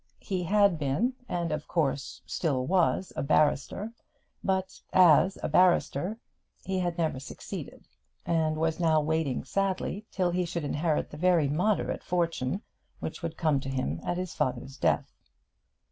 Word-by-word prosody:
He 185 Hz, -2 st, -2 dB
had 200 Hz, -1 st, +3 dB
been, 150 Hz, -, +1 dB, 0.2 s
and 170 Hz, -2 st, -1 dB
of 155 Hz, 0 st, -3 dB
course 140 Hz, -5 st, -1 dB
still 135 Hz, -7 st, -1 dB
was, 180 Hz, +1 st, +1 dB
a -, -, -1 dB
barrister; 155 Hz, +9 st, +1 dB, 0.5 s
but 190 Hz, -1 st, -1 dB
as 180 Hz, +1 st, +6 dB
a -, -, +1 dB
barrister 180 Hz, +1 st, +3 dB, 0.5 s
he 190 Hz, -1 st, -1 dB
had 175 Hz, -1 st, -1 dB
never 160 Hz, -6 st, 0 dB
succeeded, 135 Hz, -, -8 dB, 0.4 s
and 160 Hz, -2 st, +1 dB
was 160 Hz, +1 st, 0 dB
now 160 Hz, -2 st, +4 dB
waiting 155 Hz, -3 st, 0 dB
sadly 195 Hz, +1 st, -2 dB
till 180 Hz, -3 st, 0 dB
he 180 Hz, +1 st, +1 dB
should 170 Hz, -1 st, -3 dB
inherit 150 Hz, +2 st, 0 dB
the 150 Hz, -, -8 dB
very 170 Hz, -3 st, +3 dB
moderate 180 Hz, +9 st, 0 dB
fortune 170 Hz, -, -1 dB, 0.4 s
which -, -, -5 dB
would 165 Hz, -1 st, -4 dB
come 155 Hz, -4 st, +2 dB
to 135 Hz, -, -6 dB
him 85 Hz, -, -2 dB
at 175 Hz, -, -1 dB
his 180 Hz, -1 st, -4 dB
father's 130 Hz, -1 st, -2 dB
death. -, -, 0 dB
165 Hz, 150 wpm, -29 LUFS, 145-185 Hz, 0.5 s, as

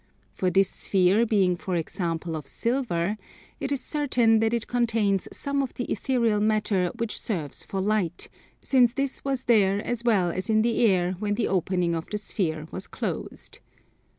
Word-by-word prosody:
For 185 Hz, -, 0 dB
this 195 Hz, +1 st, +4 dB
sphere 195 Hz, +5 st, +2 dB
being 195 Hz, -5 st, +3 dB
for 180 Hz, +1 st, -4 dB
example 165 Hz, 0 st, -2 dB
of 150 Hz, -3 st, -6 dB
silver, 220 Hz, -6 st, -1 dB, 0.4 s
it 275 Hz, -, -3 dB
is 275 Hz, -2 st, 0 dB
certain 245 Hz, -7 st, +2 dB
that 225 Hz, 0 st, +2 dB
it 235 Hz, -1 st, -1 dB
contains 225 Hz, -5 st, +1 dB
some 280 Hz, -1 st, -2 dB
of 265 Hz, -, -4 dB
the 245 Hz, -, -2 dB
ethereal 235 Hz, -5 st, +1 dB
matter 210 Hz, -4 st, +1 dB
which 230 Hz, -2 st, -3 dB
serves 160 Hz, -, -3 dB
for 195 Hz, -, -4 dB
light, 190 Hz, -4 st, 0 dB, 0.4 s
since 245 Hz, -3 st, +4 dB
this 275 Hz, 0 st, -2 dB
was 270 Hz, -2 st, -1 dB
there 200 Hz, -4 st, +3 dB
as 240 Hz, -1 st, -2 dB
well 200 Hz, -7 st, +3 dB
as 185 Hz, +4 st, -4 dB
in 215 Hz, 0 st, +4 dB
the 235 Hz, 0 st, +1 dB
air 180 Hz, -3 st, +2 dB
when 205 Hz, -1 st, -1 dB
the 235 Hz, -, 0 dB
opening 180 Hz, -2 st, 0 dB
of 165 Hz, -1 st, -3 dB
the 210 Hz, -, -2 dB
sphere 160 Hz, -7 st, -2 dB
was 185 Hz, -, -5 dB
closed. -, -, -5 dB
210 Hz, 175 wpm, -26 LUFS, 180-235 Hz, 0.4 s, this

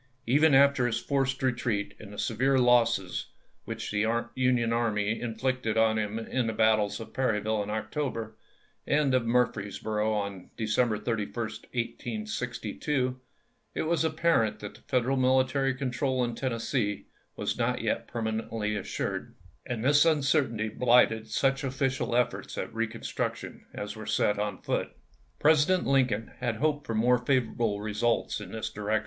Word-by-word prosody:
Even 145 Hz, +4 st, +4 dB
after 140 Hz, -2 st, +5 dB
his 115 Hz, -, 0 dB
forced 135 Hz, -2 st, -1 dB
retreat 120 Hz, -5 st, 0 dB
and 105 Hz, -2 st, -10 dB
the 105 Hz, -, -10 dB
severe 130 Hz, +6 st, +1 dB
losses 115 Hz, -7 st, +3 dB, 0.4 s
which -, -, -5 dB
the 105 Hz, +1 st, +1 dB, 0.3 s
Union 125 Hz, -2 st, +2 dB
Army 110 Hz, -2 st, 0 dB
inflicted 120 Hz, -1 st, -1 dB
on 110 Hz, 0 st, +3 dB
him 105 Hz, 0 st, -2 dB
in 115 Hz, +2 st, -1 dB
the 110 Hz, -, -1 dB
battles 110 Hz, -2 st, +2 dB
of 115 Hz, -, -9 dB
Perryville 110 Hz, -4 st, 0 dB
in 100 Hz, -, -4 dB
October, 110 Hz, +1 st, -3 dB, 0.5 s
and 145 Hz, -2 st, +2 dB
of 125 Hz, -2 st, +2 dB
Murfreesboro 110 Hz, -2 st, 0 dB
on 100 Hz, -3 st, -3 dB
December 110 Hz, 0 st, +1 dB
31, 105 Hz, -1 st, -3 dB
1862, 125 Hz, -, -3 dB, 0.6 s
it -, -, 0 dB
was 165 Hz, +1 st, +1 dB
ap 160 Hz, -1 st, -1 dB
parent 155 Hz, -11 st, +2 dB
that 105 Hz, -, -8 dB
Federal 130 Hz, +2 st, +1 dB
military 130 Hz, +1 st, +2 dB
control 130 Hz, 0 st, -1 dB
in 120 Hz, -1 st, -1 dB
Tennessee 115 Hz, -3 st, -2 dB, 0.3 s
was -, -, -2 dB
not -, -, 0 dB
yet -, -, -1 dB
permanently 110 Hz, -2 st, -2 dB
assured; 100 Hz, -, -4 dB, 0.3 s
and 120 Hz, -1 st, -3 dB
this 145 Hz, +1 st, +6 dB
uncer 150 Hz, -3 st, +3 dB
tainty 110 Hz, -1 st, -3 dB
bhghted 120 Hz, -3 st, +4 dB
such 135 Hz, +5 st, +1 dB
official 130 Hz, -2 st, -1 dB
efforts 125 Hz, -1 st, -1 dB
at -, -, -4 dB
reconstruc 115 Hz, 0 st, -2 dB
tion -, -, -10 dB
as 105 Hz, +2 st, -6 dB
were 110 Hz, -1 st, -8 dB
set 105 Hz, -1 st, +1 dB
on 105 Hz, -2 st, -3 dB
foot. -, -, -2 dB, 0.4 s
President 160 Hz, +4 st, +4 dB
Lincoln 125 Hz, -5 st, +1 dB
had 120 Hz, -2 st, -1 dB
hoped 145 Hz, +3 st, 0 dB
for 115 Hz, -, -2 dB
more 120 Hz, +3 st, +4 dB
favorable 120 Hz, -4 st, 0 dB
results 110 Hz, +3 st, 0 dB
in -, -, -8 dB
this 110 Hz, -, -4 dB
direction. 105 Hz, +1 st, 0 dB
120 Hz, 150 wpm, -28 LUFS, 110-130 Hz, 0.6 s, this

